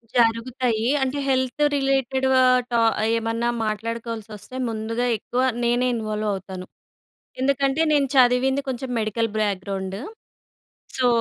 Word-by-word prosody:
జరుగుతయీ. 230 0 +1 0.2
అంటే, 265 +2 -1
health 260 +2 +1
related 270 -1 +1
ఆహ్, 255 0 +5
to 235 - +2 0.4
ఏమన్నా 230 +1 -1 0.2
మాట్లాడుకోవాల్సొస్తే 225 0 -5
ముందుగా 225 +2 -2
ఎక్కువ 245 +4 -2 0.2
నేనే 240 +1 +2
ఇన్వాల్వవుతాను. 210 -4 -3 0.8
ఎందుకంటే, 275 +2 +1
నేను 285 -2 +3
చదివింది 260 +2 +4
కొంచం 255 0 -4
మెడికల్ 225 +1 -1
బాక్‌గ్రౌండ్. 195 -2 -2 1.0
సో, 255 - +2
235 Hz, 100 wpm, -23 LUFS, 215-260 Hz, 1.0 s, ఆహ్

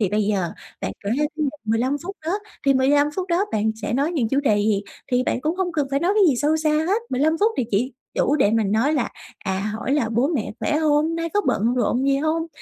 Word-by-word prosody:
Thì 205 - +2
bây 210 +3 +1
giờ 200 -4 0 0.3
bạn - - -3
kể 200 - -1
ra 300 - +2 0.4
15 235 +6 +1
phút 390 +3 -6
đó, 335 - 0 0.3
thì 275 - +5
15 285 +3 +3
phút 370 -1 -2
đó 350 +3 +2
bạn 220 0 +1
sẽ 210 - -2
nói 280 +7 +1
những 250 -9 0
chủ 275 +4 +1
đề 220 -7 +2
gì? 205 -1 +1 0.3
Thì 250 - +3
bạn 250 - -1
cũng 315 +5 -1
hông 370 -2 -1
cần 295 -4 0
phải 275 0 +1
nói 360 +4 +2
cái 425 - +4
gì 270 - +2
sâu 300 +5 +2
xa 310 -1 +1
hết, 345 +9 +1
15 290 +5 +2
phút 435 +2 +3
thì 255 - +1
chỉ 235 +6 0 0.2
đủ 290 - +2
để 205 - +3
mình 215 -3 +1
nói 230 +8 +2
là, 270 -6 0 0.4
à, 190 0 -1 0.2
hỏi 230 +4 -2
là 280 -6 +1
"Bố 235 +5 +1
mẹ 290 -10 -2
khỏe 300 - +1
hông? 310 +1 +2
Nay 330 0 -2
có 410 - +4
bận 230 +4 +1
rộn 250 +1 +1
gì 275 - +3
hông? 315 +3 0
275 Hz, 255 wpm, -22 LUFS, 225-315 Hz, 0.4 s, thì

